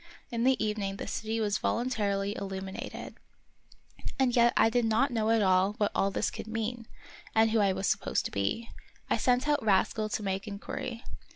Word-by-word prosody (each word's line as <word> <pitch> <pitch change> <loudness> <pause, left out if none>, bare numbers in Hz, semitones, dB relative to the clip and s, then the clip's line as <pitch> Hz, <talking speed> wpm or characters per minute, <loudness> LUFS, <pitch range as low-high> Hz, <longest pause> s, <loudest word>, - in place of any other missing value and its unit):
In 235 0 0
the 265 0 +4
evening 205 -2 -2
the - - -5
city 220 0 -3
was 210 -2 0
voluntarily 205 -5 0
illumi 190 -1 -5
nated. - - -7 1.0
And 260 -3 +2
yet 235 0 +5
I - - +6
did 240 +2 +2
not 230 +5 +2
at - - 0 0.3
all 185 0 +4
know 205 - -6
what 205 - +1
all 195 - +2
this 195 - -1
could - - -7
mean, 225 +1 -3 0.5
and 220 0 +4
who 225 - +3
I 200 -2 +4
was 190 +1 -2
supposed - - 0
to - - -3
be. 100 - -2 0.4
I - - +4
sent 250 +2 +2
out 295 -4 +2
Rascal 215 +1 +2
to 210 - -2
make 195 +2 -2
inquiry. 225 +3 -5
220 Hz, 190 wpm, -30 LUFS, 195-235 Hz, 1.0 s, I